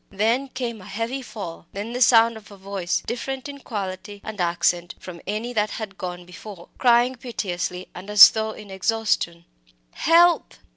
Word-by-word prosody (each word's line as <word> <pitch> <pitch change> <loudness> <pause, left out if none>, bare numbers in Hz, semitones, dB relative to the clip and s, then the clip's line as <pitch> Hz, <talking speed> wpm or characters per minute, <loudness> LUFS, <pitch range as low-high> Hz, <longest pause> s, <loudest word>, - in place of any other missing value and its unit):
Then 225 +7 +1
came 240 -5 -5
a - - -13
heavy 230 +7 -3
fall 195 -9 -8
then 210 +4 -5
the 250 - -3
sound 230 -1 +6
of 220 -1 -12
a 200 - -13
voice, 190 -2 -3
different 265 +3 -4
in 280 0 -8
quality 205 -3 -6
and 215 -3 -5
accent 175 0 0
from 175 -2 -10
any 220 +4 -3
that 215 -2 +1
had 215 -3 -6
gone 180 -1 -6
before, 180 0 -11
crying 245 +1 +4
piteously 185 -7 -4
and 185 +3 -10
as 210 0 +10
though 220 0 -2
in 210 -2 -10
exhaustion 190 -4 -1 0.5
"Help!" 340 +2 +4
210 Hz, 165 wpm, -23 LUFS, 185-235 Hz, 0.5 s, as